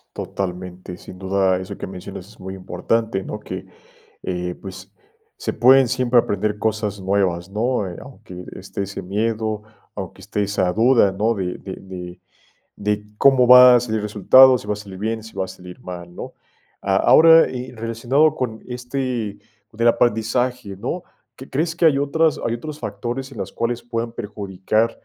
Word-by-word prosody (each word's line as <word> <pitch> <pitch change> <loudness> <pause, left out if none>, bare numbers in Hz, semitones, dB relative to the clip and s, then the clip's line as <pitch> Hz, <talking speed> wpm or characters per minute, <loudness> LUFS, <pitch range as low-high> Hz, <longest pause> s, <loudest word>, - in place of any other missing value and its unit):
Totalmente, 90 -1 -5
sin 90 - -12
duda 95 0 +1
eso 95 +2 -6
que - - -6
mencionas 95 0 -9
es 110 - -18
muy 95 0 -7
importante, 95 +2 -2
¿no?, 105 - -6
que, 95 -2 -7 0.6
eh, 90 -1 -3
pues, 95 0 -9 0.5
se - - -3
pueden 130 +1 +6
siempre 125 0 +3
aprender 105 -1 -1
cosas 105 -2 -2
nuevas, 95 -2 0
¿no?, 110 +1 -1
eh, 85 - -9
aunque 110 -9 -11
esté 100 - -5
ese 100 +1 -6
miedo, 110 +2 -2 0.3
aunque 95 -1 -7
esté 105 +1 -2
esa 95 -2 0
duda, 115 0 +4
¿no?, 105 +4 +1
de 95 -4 -3
de 95 - -8
de 90 -2 -9 0.6
de 105 0 -2
cómo 130 -1 +5
va 125 0 +10
a - - +5
salir 110 -2 -2
resultado, 125 +6 +6
si 105 - -12
va 105 - 0
a - - -4
salir 100 -2 -10
bien, 110 +1 -2
si 110 - -13
va 95 -1 -1
a - - -12
salir 90 -1 -12
mal, 85 -1 -8
¿no?, - - -7 0.5
a 95 -1 +1
ahora, 165 +8 +7 0.3
relacionado 120 +7 +1
con 110 -5 -3
este 125 -3 -3 0.3
del 115 +1 +1
aprendizaje, 120 -1 +1
¿no?, 175 - -3 0.3
¿que 130 - -12
crees 160 +4 -1
que 170 - +2
hay 150 -4 +5
otras 150 +3 +1
hay 115 - 0
otros 150 +6 -6
factores 120 +5 -5
en - - -10
las - - -4
cuales 120 +1 -2
puedan 115 -1 -4
perjudicar, 105 +1 -1
105 Hz, 170 wpm, -21 LUFS, 95-120 Hz, 0.6 s, va